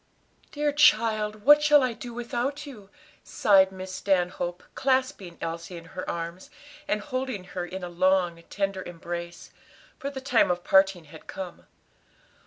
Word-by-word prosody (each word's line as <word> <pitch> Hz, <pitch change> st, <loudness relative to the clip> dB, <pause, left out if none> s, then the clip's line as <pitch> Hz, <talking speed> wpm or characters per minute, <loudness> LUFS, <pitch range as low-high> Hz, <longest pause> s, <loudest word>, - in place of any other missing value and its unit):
"Dear 295 Hz, 0 st, 0 dB
child, 215 Hz, -6 st, +3 dB
what 295 Hz, +1 st, +8 dB
shall 295 Hz, -2 st, +5 dB
I 250 Hz, -2 st, 0 dB
do 240 Hz, +1 st, -8 dB
without 245 Hz, +5 st, -3 dB
you?" 215 Hz, -9 st, -11 dB, 0.3 s
sighed 190 Hz, -2 st, +4 dB
Miss 185 Hz, 0 st, -8 dB
Stanhope, 180 Hz, -2 st, -1 dB
clasping 260 Hz, -9 st, -1 dB
Elsie 165 Hz, +2 st, -5 dB
in 165 Hz, -, -11 dB
her 185 Hz, -, -5 dB
arms, 170 Hz, +2 st, -5 dB, 0.4 s
and 210 Hz, -, 0 dB
holding 255 Hz, -5 st, -4 dB
her 180 Hz, 0 st, -5 dB
in 185 Hz, +1 st, -7 dB
a -, -, -3 dB
long, 175 Hz, -1 st, +1 dB
tender 195 Hz, -1 st, -2 dB
embrace; 170 Hz, 0 st, -7 dB, 0.5 s
for 280 Hz, -, -3 dB
the 275 Hz, -2 st, -6 dB
time 255 Hz, -6 st, +3 dB
of 175 Hz, 0 st, -1 dB
parting 190 Hz, -2 st, +4 dB
had 155 Hz, +1 st, -14 dB
come. 185 Hz, -2 st, -8 dB
195 Hz, 150 wpm, -26 LUFS, 175-255 Hz, 0.5 s, what